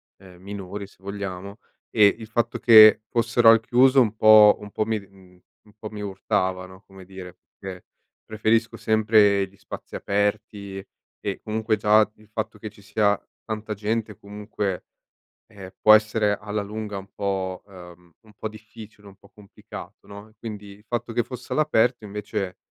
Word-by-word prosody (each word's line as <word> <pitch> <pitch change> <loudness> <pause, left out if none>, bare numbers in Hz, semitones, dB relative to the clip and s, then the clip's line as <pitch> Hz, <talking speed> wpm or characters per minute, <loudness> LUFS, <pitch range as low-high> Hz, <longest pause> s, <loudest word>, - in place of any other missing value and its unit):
ehm, 90 -2 -17
minori 100 0 -7
se - - -23
vogliamo. 100 0 -7 0.3
Ehm, 105 -3 +5
il 110 - -9
fatto 115 +1 -1
che 110 -2 +8
fossero 115 0 +3
al 115 0 +7
chiuso 130 +4 +4
un 110 -4 +2
po' 110 -1 +7
un 105 -1 -10
po' 110 - -1
mi 110 0 -1
d 100 -2 -11
mhmm, 95 -2 -20 0.3
un 105 - -21
po' 110 -1 -8
mi 105 - -9
urtava, 95 -2 -2
no, 95 +1 -15
come 95 -1 -14
dire, 90 -1 -11 0.2
perché 95 -2 -9 0.4
preferisco 110 +1 0
sempre 105 -2 +3
gli 95 +1 -24
spazi - - -10
aperti 100 -1 -2 0.4
e - - -5
comunque, 110 +1 -1
già 105 +1 +3
il 110 0 -22
fatto 110 0 -5
che 110 +1 -7
ci 100 - -19
sia 105 -1 +1 0.3
tanta 110 -1 -5
gente, 105 0 -3
comunque, 105 -2 -5 0.6
eh, 100 -4 -12
può 110 - +6
essere 110 -1 +3
alla 105 0 -3
lunga 105 0 -6
un 95 0 -9
po' 95 -2 -3
uhm, 90 -3 -15
un 110 -2 -20
po' 110 - -5
difficile, 110 -1 -14
un 100 - -15
po' 100 - -21
complicato, 105 -2 -13
no, 100 +2 -12
quindi 105 -3 -8
il 100 +1 -16
fatto 120 -1 -3
che 120 +1 +1
fosse 125 +2 -9
all'aperto, 125 -7 +1
invece, 105 -2 -5
105 Hz, 170 wpm, -24 LUFS, 100-110 Hz, 0.6 s, che